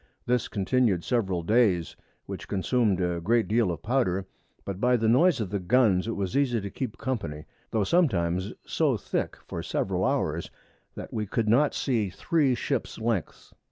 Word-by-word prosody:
This 125 -1 +1
continu'd 100 -3 +1
several 95 -8 0
Days, 100 -4 +2 0.3
which - - -7
consumed 105 0 +1
a 90 -2 -1
great 115 +5 +2
deal 110 -2 +2
of 85 - -6
Powder, 105 -6 0 0.4
but 100 0 -5
by 125 0 +4
the 110 -1 0
Noise 155 +7 +4
of 95 -4 -4
the 100 - -1
Guns 100 -1 +3
it 115 - -2
was 95 -2 -3
easy 130 -4 +2
to 100 -1 -6
keep 125 -5 -5
Company, 85 - -4 0.2
tho' 110 -2 +1
sometimes 95 - +1
so - - +1
thick - - -3
for - - -5
several - - -1
Hours, - - 0 0.5
that - - -8
we 105 -2 -2
could 110 +2 -1
not 135 +7 +3
see 115 -7 0
three 135 - +1
Ships 130 -1 -2
Lengths. 110 -6 -3
110 Hz, 170 wpm, -27 LUFS, 95-125 Hz, 0.5 s, by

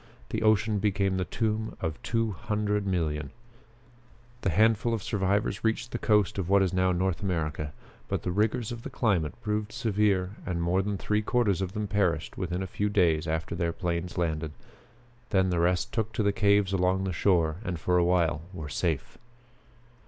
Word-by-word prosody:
The - - -2
ocean 110 -1 +3
became 100 -2 +1
the 90 - 0
tomb 110 +3 -2
of 80 -1 -3
two 115 -1 0
hundred 105 -1 -1
millions. 80 -5 -1 1.1
The - - +1
handful 110 +5 +3
of 105 - -5
survivors 100 -2 0
reached 115 +1 0
the 120 - -3
coast 105 -3 +2
of 90 -2 -2
what 100 0 +5
is 95 - -1
now 95 0 +3
North 90 0 0
America. 75 -6 -2 0.4
But - - -2
the 90 - -1
rigors 110 +4 0
of 120 -1 -6
the - - -6
climate 90 - 0
proved 105 0 -1
severe 105 -4 0
and 90 -2 -2
more 85 +3 +2
than 100 0 -2
three 105 +2 0
quarters 105 -4 +1
of 95 0 -3
them 105 -1 -2
perished 95 -5 0
within 90 0 -2
a - - -2
few 100 +3 -1
days 85 -5 +2
after 80 0 -2
their 85 -1 0
planes 85 0 -3
landed. 80 -3 -1 0.8
Then 95 -2 +2
the 85 - +1
rest 90 +1 +1
took 110 -1 -1
to 110 - 0
the 100 0 +2
caves 100 0 +3
along 95 0 +2
the 95 -1 -2
shore, 85 -3 +2
and 90 -5 -3
for 90 +2 +2
a - - +4
while 85 -3 +2
were 80 -4 -6
safe." 80 -1 -2
95 Hz, 185 wpm, -28 LUFS, 85-105 Hz, 1.1 s, what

